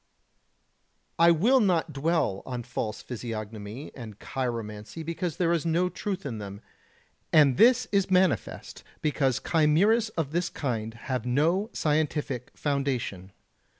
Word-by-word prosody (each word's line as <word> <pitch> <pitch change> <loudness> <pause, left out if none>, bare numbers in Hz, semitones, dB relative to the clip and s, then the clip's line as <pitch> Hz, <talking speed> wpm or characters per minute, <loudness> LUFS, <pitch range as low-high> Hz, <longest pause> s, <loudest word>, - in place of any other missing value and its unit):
I 170 0 +7
will 215 +11 +4
not 175 -7 +1
dwell 140 - 0
on 125 -2 -5
false 115 -3 -4
physiognomy 110 +1 -6
and 110 -6 -9
chiromancy 115 +2 -4
because 170 0 -3
there 175 -2 +2
is 165 - 0
no 170 +2 +1
truth 190 0 -4
in 115 -6 -4
them, 100 -1 -7 0.7
and 145 -4 +6
this 250 - +5
is 195 -2 +2
manifest 185 -3 0 0.2
because 135 -4 +1
chimeras 180 +9 +3
of 155 -4 -1
this 175 +2 0
kind 115 -5 -3
have 125 0 -4
no 165 - +2
scientific 150 -4 -1
foundation. 130 -10 -2
150 Hz, 125 wpm, -27 LUFS, 120-170 Hz, 0.7 s, I